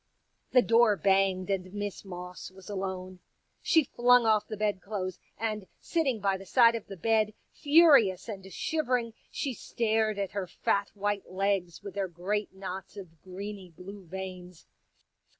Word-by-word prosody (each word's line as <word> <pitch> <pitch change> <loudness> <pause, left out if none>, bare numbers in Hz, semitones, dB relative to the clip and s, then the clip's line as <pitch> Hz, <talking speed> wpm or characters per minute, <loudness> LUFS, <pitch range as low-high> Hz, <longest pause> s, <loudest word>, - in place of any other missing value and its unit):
'' - - -48
\ - - -46
The 250 -1 +6
door 230 -2 +5
banged 190 -1 +2
and 185 -1 -2
Miss 205 -1 -4
Moss 180 -1 -8
was 190 +2 -12
alone. 185 -1 -4 0.4
She 320 -2 +4
flung 245 -2 +4
off 215 -2 +3
the 215 - -5
bed 205 -2 0
clothes, 190 -3 -4 0.2
and 215 -3 -3
sitting 280 -9 0
by 195 -1 +1
the 195 - -11
side 235 0 +6
of 230 -2 -5
the 195 - -8
bed, 215 +2 +1 0.2
furious 285 - +5
and 195 -3 -7
shivering, 250 -6 -1 0.2
she 275 -3 -3
stared 220 -1 0
at 195 -2 -2
her 200 -2 -3
fat 200 +3 0
white 205 0 -2
legs 185 -2 -1
with 200 - -7
their 200 -1 -1
great 190 +5 -2
knots 190 +1 -7
of 165 -5 -11
greeny 195 0 -7
blue 190 +4 -11
veins. 180 -1 -8
200 Hz, 165 wpm, -29 LUFS, 185-220 Hz, 0.4 s, The